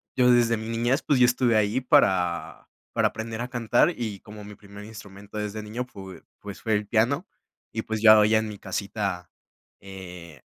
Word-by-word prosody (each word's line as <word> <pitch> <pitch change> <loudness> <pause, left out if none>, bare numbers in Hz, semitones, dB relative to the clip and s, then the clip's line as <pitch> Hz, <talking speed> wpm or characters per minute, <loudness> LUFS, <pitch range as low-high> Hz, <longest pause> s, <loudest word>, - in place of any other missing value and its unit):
yo 125 -1 +4
desde 120 -1 +3
mi 110 +1 -7
niñez, 120 +4 0
pues, 140 - +1
yo 125 - +7
estuve 125 -1 +2
ahí 105 +4 +1
para 90 -8 +1 0.2
para - - +3
aprender 110 +1 -6
a 125 - -3
cantar, 120 +5 +2
y 110 -5 -4
como 105 0 -12
mi 105 +1 -10
primer 100 0 -13
instrumento 105 -1 -11
desde 105 +1 -4
niño 110 +4 -5
f 125 - -6
pue 95 -3 -10 0.2
pues 100 -1 -9
fue 110 - -1
el 105 0 -1
piano, 125 - +1 0.4
y 110 - -3
pues, 110 -1 -4
ya 110 -1 +9
hoy 105 +1 +4
en 110 0 +1
mi 105 -2 -8
casita, 95 -2 -4 0.5
eh, 90 -6 -11
110 Hz, 195 wpm, -25 LUFS, 100-115 Hz, 0.5 s, ya